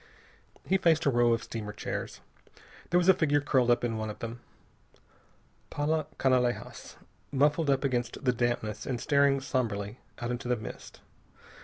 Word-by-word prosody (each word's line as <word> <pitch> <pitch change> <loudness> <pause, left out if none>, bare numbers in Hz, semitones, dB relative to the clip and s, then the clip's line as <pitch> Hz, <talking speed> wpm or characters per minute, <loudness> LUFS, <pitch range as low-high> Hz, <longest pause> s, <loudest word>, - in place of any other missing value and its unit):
He 190 - +2
faced 165 -3 +3
a 140 - +4
row 120 -1 +3
of 115 0 +1
steamer 105 -2 -6
chairs. - - -5 0.7
There 175 - +3
was 175 0 +2
a 190 - +9
figure 145 -4 +2
curled 130 -3 +2
up 120 0 +3
in 115 -2 -1
one 110 0 -3
of 105 - -6
them. 115 +1 -6 1.3
Paula 150 +1 -1
Canalejas, 125 -2 0 0.4
muffled 145 +2 +2
up 135 0 +2
against 125 -1 -2
the 125 - +3
dampness 120 -3 -2
and 125 -3 -2
staring 140 -1 +3
somberly 115 -5 -2 0.2
out 120 -1 -3
into 120 0 -4
the 125 - +2
mist. 110 -2 -9
125 Hz, 160 wpm, -29 LUFS, 120-145 Hz, 1.3 s, a